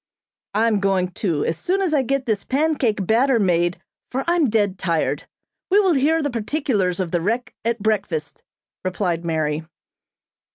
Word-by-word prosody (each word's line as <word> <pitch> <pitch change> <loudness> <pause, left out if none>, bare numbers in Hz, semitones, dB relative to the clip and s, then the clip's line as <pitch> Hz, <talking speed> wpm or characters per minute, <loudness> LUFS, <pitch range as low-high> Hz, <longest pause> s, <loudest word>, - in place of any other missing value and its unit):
"I'm 220 -1 +3
going 190 -2 +1
too, 170 -6 -1
as 160 - -1
soon 380 +2 0
as 370 -5 0
I 290 - +4
get 270 +1 -1
this 215 -4 0
pancake 265 -8 +1
batter 240 +5 +3
made, 175 -4 +1 0.3
for 265 +2 -2
I'm 340 -5 +2
dead 205 -4 +1
tired. 170 -4 -1 0.4
We 395 +2 +5
will 380 -4 +4
hear 310 +3 +2
the 290 - -1
particulars 225 - -1
of 180 -3 -2
the 175 - +1
wreck 230 +7 -1
at 230 -2 -1
breakfast," 195 -9 -1 0.4
replied 180 -2 -1
Mary. 155 -2 -1
215 Hz, 160 wpm, -22 LUFS, 180-270 Hz, 0.4 s, We